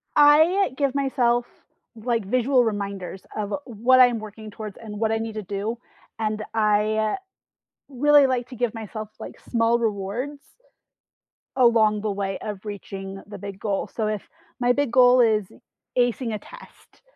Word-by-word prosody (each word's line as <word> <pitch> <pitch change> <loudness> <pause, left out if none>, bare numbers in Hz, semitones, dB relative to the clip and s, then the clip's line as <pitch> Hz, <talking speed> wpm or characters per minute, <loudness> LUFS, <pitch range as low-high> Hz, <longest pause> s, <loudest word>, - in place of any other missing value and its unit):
I 315 +6 +5
give 280 -3 +1
myself, 245 -3 +1 0.5
like, 230 -1 -1
visual 250 +4 +3
reminders 200 -4 -4
of 210 -1 -3
what 245 +2 +3
I'm 245 -2 +6
working 215 0 -9
towards 210 -1 -8
and 210 -2 -8
what 220 0 +1
I 225 - +1
need 225 0 -4
to 215 0 -5
do, 205 +4 -3 0.4
and 215 -1 -1
I 215 - +2 0.7
really 290 +1 +5
like 250 -2 -1
to 255 - -9
give 240 -2 -1
myself, 215 -1 -7
like, - - -9
small 230 0 +1
rewards 230 +6 -3 1.2
along 225 -4 +4
the 215 0 -1
way 195 -1 -3
of 205 -1 -6
reaching 195 -1 -7
the 205 -1 -8
big 200 0 -8
goal. 200 -3 -1
So, 220 -2 -3
if 215 -2 -2 0.4
my 245 0 +3
big 285 -2 0
goal 250 0 +6
is 215 -3 +3 0.5
acing 245 -1 +1
a - - -1
test, - - -16
225 Hz, 155 wpm, -24 LUFS, 210-245 Hz, 1.2 s, I'm